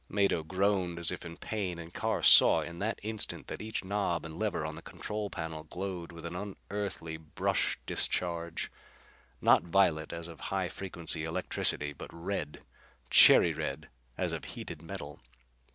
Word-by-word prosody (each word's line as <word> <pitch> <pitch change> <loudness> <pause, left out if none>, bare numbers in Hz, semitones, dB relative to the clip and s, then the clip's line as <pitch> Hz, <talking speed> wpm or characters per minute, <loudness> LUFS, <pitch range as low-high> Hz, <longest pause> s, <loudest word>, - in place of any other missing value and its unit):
Mado 100 -4 +2
groaned 95 +1 0
as 85 0 +3
if 90 - -6
in 85 -1 -8
pain 95 -5 -3
and 85 0 -9
Carr - - -1
saw - - +8
in 85 0 -7
that 110 +3 -1
instant 110 0 -4
that - - -6
each 110 -1 -3
knob 95 -4 -1
and 80 +1 -8
lever 105 -7 -1
on 80 - -4
the 80 - -9
control 105 +4 -5
panel 80 -3 -5
glowed 90 +1 -5
with 85 0 -10
an 85 +1 -5
unearthly 100 -4 -5
brush 80 -1 0
discharge. 85 -1 -1 0.7
Not - - +6
violet 85 -3 +2
as 85 0 -5
of 85 -2 -11
high 95 -2 -1
frequency 85 -4 -1
electricity, 75 -2 0
but - - -9
red. 85 -2 -4 0.5
Cherry - - +8
red 75 +3 -4 0.3
as - - 0
of - - -5
heated - - -7
metal. 80 -4 -8
85 Hz, 160 wpm, -31 LUFS, 80-100 Hz, 0.7 s, saw